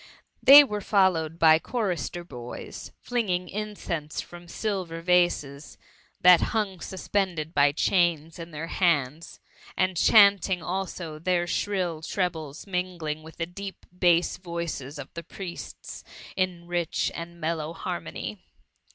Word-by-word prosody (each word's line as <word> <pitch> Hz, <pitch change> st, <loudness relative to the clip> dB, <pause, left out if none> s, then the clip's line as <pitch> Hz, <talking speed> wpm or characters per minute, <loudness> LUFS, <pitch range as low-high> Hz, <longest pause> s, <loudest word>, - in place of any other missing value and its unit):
They 285 Hz, +2 st, +11 dB
were 210 Hz, -6 st, -4 dB
followed 180 Hz, -6 st, +2 dB
by 160 Hz, -1 st, +6 dB
chorister 180 Hz, -5 st, -3 dB
boys, 125 Hz, -7 st, -9 dB
flinging 190 Hz, -7 st, -1 dB
in 210 Hz, +1 st, -4 dB
eeuse 155 Hz, -6 st, -4 dB
from 175 Hz, 0 st, -9 dB
silver 185 Hz, -4 st, -3 dB
vases, 165 Hz, -5 st, +1 dB, 0.4 s
that 180 Hz, -1 st, +8 dB
hung 205 Hz, -5 st, -1 dB
suspended 180 Hz, -4 st, -2 dB
by 145 Hz, 0 st, +4 dB
diains 165 Hz, 0 st, +1 dB
in 165 Hz, 0 st, -7 dB
their, 160 Hz, 0 st, -6 dB
bauds, 160 Hz, -3 st, 0 dB, 0.4 s
and 185 Hz, -1 st, +1 dB
chanting 200 Hz, -2 st, +5 dB
also; 175 Hz, -3 st, -4 dB
tfadr 175 Hz, +1 st, +1 dB
shrill 180 Hz, -4 st, -1 dB
trebles 160 Hz, -5 st, -3 dB
mingling 180 Hz, -5 st, -3 dB
with 160 Hz, +1 st, -13 dB
the 165 Hz, -, -1 dB
deep 195 Hz, +3 st, -9 dB
bass 175 Hz, -1 st, +3 dB
voices 170 Hz, -5 st, -5 dB
of -, -, -9 dB
the 170 Hz, -, -6 dB
priests 175 Hz, +1 st, -8 dB, 0.3 s
in 180 Hz, -2 st, -1 dB
rich 175 Hz, -1 st, -1 dB
and 170 Hz, +1 st, -8 dB
mel 165 Hz, +1 st, -1 dB
low 155 Hz, +1 st, -5 dB
harmony. -, -, -5 dB
175 Hz, 130 wpm, -26 LUFS, 160-190 Hz, 0.4 s, They